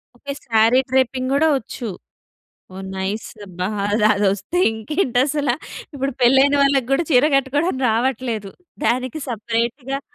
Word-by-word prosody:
Okay. 280 Hz, +3 st, -6 dB
Sorry 230 Hz, +2 st, +4 dB
draping 260 Hz, 0 st, +1 dB
కూడా 320 Hz, +3 st, +3 dB
వచ్చు. 240 Hz, 0 st, -7 dB, 0.9 s
ఓహ్! 190 Hz, 0 st, -7 dB
Nice 195 Hz, +3 st, -3 dB, 0.2 s
అబ్బా! 180 Hz, 0 st, -4 dB, 0.2 s
అది 210 Hz, +1 st, +2 dB
అదొస్తే 200 Hz, -, -1 dB, 0.2 s
ఇంకేంటసలా. 265 Hz, -, 0 dB, 0.4 s
ఇప్పుడు 275 Hz, 0 st, -2 dB
పెళ్ళైన 270 Hz, +3 st, +5 dB
వాళ్ళకి 275 Hz, -3 st, +2 dB
కూడా 300 Hz, +5 st, +2 dB
చీర 255 Hz, +1 st, +5 dB
కట్టుకోవడానికి 275 Hz, +2 st, 0 dB
రావట్లేదు. 230 Hz, -3 st, -1 dB, 0.4 s
దానికి 255 Hz, +5 st, 0 dB
సెపరేట్‌గా 235 Hz, +4 st, -2 dB
255 Hz, 120 wpm, -20 LUFS, 220-275 Hz, 0.9 s, పెళ్ళైన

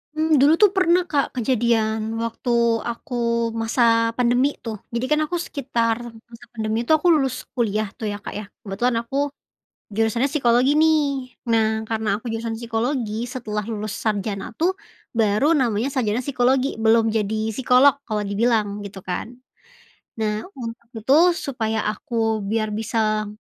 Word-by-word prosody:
Mmm, 310 Hz, -1 st, +3 dB
dulu 285 Hz, +4 st, +6 dB
tuh 415 Hz, -3 st, +7 dB
pernah 360 Hz, -1 st, +4 dB
Kak, 285 Hz, -3 st, 0 dB
kejadian 225 Hz, -2 st, 0 dB
waktu 230 Hz, +2 st, -3 dB, 0.4 s
aku 245 Hz, +3 st, -6 dB, 0.5 s
masa 230 Hz, 0 st, +2 dB
pandemi 250 Hz, +3 st, +2 dB
tuh. 225 Hz, -2 st, -4 dB, 0.2 s
Jadi 235 Hz, +2 st, -1 dB
kan 300 Hz, -, +4 dB
aku 350 Hz, -, -3 dB
sekitar 240 Hz, -8 st, -1 dB, 0.3 s
masa 230 Hz, -1 st, -13 dB
pandemi 220 Hz, -1 st, -2 dB
itu -, -, -1 dB
aku 310 Hz, -, -1 dB
lulus 270 Hz, -5 st, 0 dB
kuliah 215 Hz, -3 st, 0 dB
tuh 225 Hz, -3 st, -4 dB
ya 205 Hz, -, -4 dB
Kak -, -, -6 dB
ya, 210 Hz, -, -7 dB, 0.2 s
kebetulan 225 Hz, +5 st, -1 dB
aku 250 Hz, +4 st, -4 dB, 0.7 s
jurusannya 225 Hz, +4 st, +1 dB
psikologi 260 Hz, -1 st, +3 dB
nih. 315 Hz, 0 st, +5 dB, 0.5 s
Nah 225 Hz, -1 st, +3 dB, 0.2 s
karena 215 Hz, -2 st, -1 dB
aku 230 Hz, -, -27 dB
jurusan 225 Hz, 0 st, -3 dB
psikologi, 230 Hz, -1 st, -2 dB
setelah 240 Hz, -4 st, -4 dB
lulus 215 Hz, -1 st, -4 dB
sarjana 205 Hz, -1 st, -2 dB
tuh, 360 Hz, +4 st, +2 dB, 0.4 s
baru 220 Hz, +4 st, +2 dB
namanya 240 Hz, -4 st, +1 dB
sarjana 230 Hz, -4 st, 0 dB
psikologi, 260 Hz, 0 st, +1 dB
belum 225 Hz, 0 st, +3 dB
jadi 220 Hz, 0 st, -1 dB
psikolog 265 Hz, +2 st, +5 dB
kalau 215 Hz, -2 st, -1 dB
dibilang, 210 Hz, -1 st, 0 dB
gitu 200 Hz, -1 st, -8 dB
kan. 185 Hz, +5 st, -5 dB, 0.8 s
Nah, 215 Hz, +2 st, -2 dB
untuk 235 Hz, -2 st, -7 dB
itu 225 Hz, +4 st, +1 dB, 0.2 s
supaya 225 Hz, -8 st, -2 dB
aku 225 Hz, -1 st, -1 dB
biar 215 Hz, +1 st, -1 dB
bisa 215 Hz, 0 st, 0 dB
230 Hz, 145 wpm, -22 LUFS, 215-255 Hz, 0.8 s, tuh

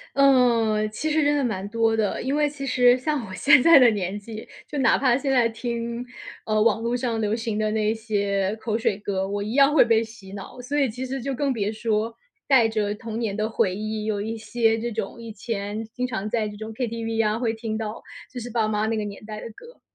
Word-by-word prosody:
呃， 240 Hz, -6 st, +4 dB
其 285 Hz, +9 st, -3 dB
实 310 Hz, +1 st, +2 dB
真 290 Hz, 0 st, +3 dB
的 285 Hz, -, +1 dB
蛮 200 Hz, -5 st, -2 dB
多 225 Hz, +1 st, +1 dB
的。 215 Hz, -3 st, -1 dB
因 265 Hz, +3 st, -1 dB
为 295 Hz, 0 st, +2 dB
其 280 Hz, -1 st, -6 dB
实 245 Hz, -1 st, +5 dB
像 290 Hz, -1 st, -1 dB
我 190 Hz, -, -8 dB
现 280 Hz, +3 st, +5 dB
在 330 Hz, +1 st, +8 dB
的 250 Hz, -2 st, +7 dB
年 200 Hz, -2 st, -2 dB
纪， 215 Hz, +1 st, -9 dB, 0.2 s
就 295 Hz, -, -5 dB
哪 260 Hz, -4 st, +4 dB
怕 255 Hz, -3 st, +3 dB
现 275 Hz, +1 st, -2 dB
在 245 Hz, -3 st, +4 dB
听， 235 Hz, +1 st, -4 dB, 0.4 s
呃， 215 Hz, -1 st, +1 dB
网 225 Hz, 0 st, +3 dB
路 235 Hz, +1 st, 0 dB
上 240 Hz, -3 st, -2 dB
流 210 Hz, 0 st, 0 dB
行 225 Hz, -2 st, -3 dB
的 215 Hz, 0 st, 0 dB
那 215 Hz, 0 st, +1 dB
些 200 Hz, -2 st, -1 dB
口 220 Hz, 0 st, -2 dB
水 220 Hz, -3 st, 0 dB
歌， 195 Hz, -2 st, -2 dB
我 205 Hz, 0 st, -2 dB
一 210 Hz, +2 st, -4 dB
样 275 Hz, +3 st, +5 dB
会 300 Hz, -, +7 dB
被 230 Hz, -1 st, +3 dB
洗 220 Hz, -4 st, -11 dB
脑。 200 Hz, +5 st, -9 dB
所 280 Hz, +4 st, -2 dB
以 275 Hz, -2 st, +3 dB
其 250 Hz, +3 st, -5 dB
实 265 Hz, +1 st, -4 dB
就 270 Hz, +3 st, -3 dB
更 275 Hz, +1 st, 0 dB
别 210 Hz, -4 st, -1 dB
说 220 Hz, 0 st, -1 dB, 0.3 s
带 255 Hz, -5 st, +5 dB
着 210 Hz, -2 st, -1 dB
童 220 Hz, +1 st, -6 dB
年 220 Hz, -4 st, -2 dB
的 215 Hz, 0 st, 0 dB
回 220 Hz, -4 st, 0 dB
忆， 215 Hz, +1 st, -4 dB
有 215 Hz, -2 st, -1 dB
一 220 Hz, +2 st, -3 dB
些 225 Hz, 0 st, +1 dB
这 235 Hz, +1 st, -3 dB
种 225 Hz, +1 st, -5 dB
以 230 Hz, -1 st, -8 dB
前 210 Hz, -1 st, -4 dB
经 250 Hz, 0 st, -2 dB
常 220 Hz, -4 st, -4 dB
在 220 Hz, -1 st, 0 dB
这 210 Hz, -, -9 dB
种 220 Hz, +1 st, -7 dB
KTV 225 Hz, -1 st, -2 dB
啊， 210 Hz, +1 st, 0 dB
会 235 Hz, -2 st, 0 dB
听 220 Hz, -1 st, -4 dB
到 220 Hz, 0 st, -5 dB, 0.3 s
就 250 Hz, -, -6 dB
是 240 Hz, +1 st, -7 dB
爸 225 Hz, -2 st, +1 dB
妈 215 Hz, 0 st, 0 dB
那 225 Hz, 0 st, -1 dB
个 215 Hz, -, -2 dB
年 205 Hz, 0 st, -8 dB
代 215 Hz, 0 st, -7 dB
的 -, -, -8 dB
歌。 475 Hz, -, -15 dB
225 Hz, 265 characters per minute, -24 LUFS, 215-245 Hz, 0.4 s, 在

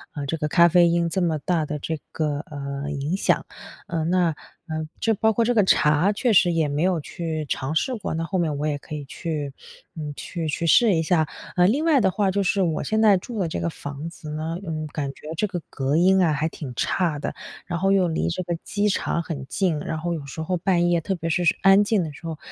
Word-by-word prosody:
呃， 145 Hz, -2 st, -3 dB
这 165 Hz, -, -1 dB
个 150 Hz, -, -1 dB
咖 170 Hz, +3 st, +6 dB
啡 175 Hz, 0 st, +5 dB
因 170 Hz, 0 st, +2 dB
这 185 Hz, +3 st, -1 dB
么 165 Hz, -3 st, +1 dB
大 160 Hz, +1 st, 0 dB
的 150 Hz, -, -3 dB
这 160 Hz, +2 st, -4 dB
个， 150 Hz, -2 st, -1 dB
呃， 140 Hz, -1 st, -5 dB
影 145 Hz, +4 st, -2 dB
响。 195 Hz, -, +1 dB, 0.4 s
呃， 165 Hz, -2 st, -2 dB
那， 175 Hz, 0 st, +2 dB, 0.4 s
呃， 155 Hz, -1 st, -3 dB
就 225 Hz, -, +2 dB
包 220 Hz, +2 st, +2 dB
括 230 Hz, +2 st, +2 dB
这 245 Hz, -, +2 dB
个 215 Hz, -3 st, +4 dB
茶 150 Hz, +1 st, +4 dB
确 225 Hz, +3 st, +1 dB
实 180 Hz, -2 st, +5 dB
也 165 Hz, -2 st, +1 dB
没 145 Hz, +1 st, -1 dB
有 180 Hz, -1 st, +2 dB
去 160 Hz, 0 st, -4 dB
尝 135 Hz, +3 st, -2 dB
试 255 Hz, +10 st, +1 dB
过， 215 Hz, -, -4 dB
那 165 Hz, -, -2 dB
后 185 Hz, +3 st, -1 dB
面 155 Hz, -4 st, 0 dB
我 145 Hz, -, -2 dB
也 145 Hz, -1 st, -1 dB
可 150 Hz, -, -8 dB
以 145 Hz, -2 st, -6 dB
去 150 Hz, -1 st, -4 dB, 0.4 s
嗯， 150 Hz, -2 st, -5 dB
去 165 Hz, +1 st, -5 dB
去 155 Hz, +2 st, -2 dB
试 220 Hz, +5 st, +6 dB
一 160 Hz, -, +2 dB
下。 160 Hz, -1 st, +2 dB, 0.3 s
呃， 180 Hz, -, +5 dB
另 280 Hz, +10 st, +1 dB
外 315 Hz, -4 st, +5 dB
的 190 Hz, -3 st, +3 dB
话 200 Hz, 0 st, +1 dB
就 200 Hz, +1 st, 0 dB
是 195 Hz, +1 st, +1 dB
我 165 Hz, -4 st, 0 dB
现 220 Hz, 0 st, 0 dB
在 210 Hz, -3 st, +6 dB
住 220 Hz, +4 st, -6 dB
的 180 Hz, -, +1 dB
这 160 Hz, -, -3 dB
个 170 Hz, -, 0 dB
房 145 Hz, 0 st, -7 dB
子 165 Hz, -2 st, -10 dB
呢， 160 Hz, +2 st, -3 dB
嗯， 155 Hz, -2 st, -3 dB
感 145 Hz, -1 st, -3 dB
觉 150 Hz, -, -13 dB
这 210 Hz, -, +1 dB
个 180 Hz, -3 st, -4 dB
隔 135 Hz, +1 st, -1 dB
音 190 Hz, +3 st, +5 dB
啊 165 Hz, -4 st, +3 dB
还 150 Hz, +2 st, 0 dB
挺 145 Hz, -5 st, -7 dB
差 170 Hz, +1 st, 0 dB
的， -, -, -3 dB, 0.3 s
然 175 Hz, -2 st, -3 dB
后 195 Hz, +2 st, +2 dB
又 190 Hz, -2 st, +4 dB
离 160 Hz, -, -1 dB
这 175 Hz, +2 st, -3 dB
个 175 Hz, -1 st, -2 dB
机 205 Hz, +1 st, 0 dB
场 170 Hz, -3 st, -1 dB
很 145 Hz, -5 st, -5 dB
近， 175 Hz, -1 st, 0 dB
然 155 Hz, +2 st, -4 dB
后 170 Hz, +2 st, -2 dB
有 155 Hz, -4 st, -5 dB
时 140 Hz, +3 st, -6 dB
候 180 Hz, +3 st, -1 dB
半 175 Hz, -1 st, +2 dB
夜， 175 Hz, -1 st, +3 dB
特 190 Hz, +4 st, -2 dB
别 165 Hz, -1 st, -4 dB
是 175 Hz, +2 st, +1 dB, 0.2 s
安 195 Hz, +1 st, +6 dB
静 205 Hz, -2 st, +1 dB
的 155 Hz, -, -5 dB
时 165 Hz, -, -13 dB
候， 160 Hz, -1 st, -4 dB
165 Hz, 270 characters per minute, -24 LUFS, 155-185 Hz, 0.4 s, 咖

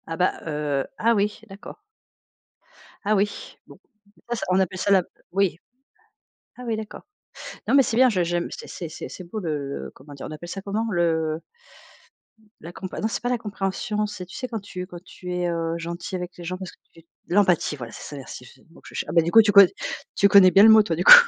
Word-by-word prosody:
Ah 165 Hz, -, -4 dB
bah, 180 Hz, -, +2 dB
heu 150 Hz, -3 st, -1 dB
ah 230 Hz, +1 st, +3 dB
oui, 210 Hz, +1 st, -1 dB
d'accord. 200 Hz, -, -11 dB, 1.2 s
Ah 215 Hz, +1 st, +2 dB
oui? 205 Hz, +1 st, -2 dB
Bon, -, -, -15 dB, 0.4 s
des -, -, -26 dB
fois 240 Hz, -, -2 dB
ça -, -, -4 dB
on 185 Hz, +1 st, +3 dB
appelle 185 Hz, 0 st, 0 dB
ça 200 Hz, +2 st, 0 dB
la 190 Hz, -2 st, +5 dB, 0.3 s
oui. 195 Hz, -3 st, +1 dB, 1.0 s
Ah 250 Hz, -, -10 dB
oui, 225 Hz, -2 st, -1 dB
d'accord. 215 Hz, 0 st, -8 dB, 0.6 s
Non -, -, +2 dB
mais 275 Hz, -, +7 dB
c'est 230 Hz, -2 st, -2 dB
bien 255 Hz, +1 st, +6 dB
je 185 Hz, -5 st, +1 dB
j'aime 175 Hz, 0 st, -1 dB
c'est -, -, -9 dB, 0.2 s
c'est -, -, -7 dB
c'est 185 Hz, -, -9 dB
beau 175 Hz, +5 st, -6 dB
le 160 Hz, -5 st, -2 dB, 0.3 s
le -, -, -9 dB
comment 145 Hz, +2 st, -15 dB
dire? 140 Hz, -, -8 dB
On -, -, -8 dB
appelle 165 Hz, +3 st, -8 dB
ça 195 Hz, -, -5 dB
comment? 210 Hz, +3 st, -2 dB
Le 160 Hz, -3 st, 0 dB, 1.2 s
la 170 Hz, -, -8 dB
compré 185 Hz, +1 st, -7 dB
non 220 Hz, -, +1 dB
c'est 225 Hz, -, -4 dB
pas 245 Hz, -, 0 dB
la 250 Hz, -, +1 dB
compréhension, 210 Hz, 0 st, -2 dB
c'est 205 Hz, -3 st, -7 dB
tu 185 Hz, -, -12 dB
sais 260 Hz, -4 st, -4 dB
quand 225 Hz, -3 st, -4 dB
tu 185 Hz, -2 st, -7 dB
quand 180 Hz, -1 st, -11 dB
tu 180 Hz, -1 st, -9 dB
es, 180 Hz, 0 st, -1 dB
heu, 165 Hz, -1 st, -2 dB
gentil 170 Hz, +2 st, -5 dB
avec 180 Hz, 0 st, -5 dB
les 175 Hz, -, -9 dB
gens 180 Hz, +2 st, -4 dB
parce 190 Hz, -1 st, -7 dB
que -, -, -22 dB, 0.2 s
tu 165 Hz, -, -17 dB, 0.3 s
l'empathie! 180 Hz, -5 st, +2 dB
Voilà 120 Hz, -5 st, -8 dB
c'est -, -, -10 dB
ça 145 Hz, -, -8 dB
merci 130 Hz, -2 st, -9 dB
je -, -, -15 dB
c'est 130 Hz, -, -23 dB
le -, -, -26 dB
mot 165 Hz, -, -18 dB
que -, -, -16 dB
je -, -, -13 dB
cher -, -, -3 dB
ah -, -, -4 dB
bah 170 Hz, -, +6 dB
du 170 Hz, -, -2 dB
coup, 225 Hz, -, +9 dB
tu 210 Hz, -1 st, +2 dB
co 200 Hz, 0 st, +10 dB, 0.5 s
tu 200 Hz, -, +5 dB
connais 195 Hz, -2 st, +7 dB
bien 195 Hz, +3 st, +7 dB
le 220 Hz, -, +9 dB
mot 220 Hz, -1 st, +8 dB
toi 170 Hz, -5 st, -1 dB
du 175 Hz, -, -1 dB
coup. -, -, +12 dB
185 Hz, 250 wpm, -24 LUFS, 170-210 Hz, 1.2 s, coup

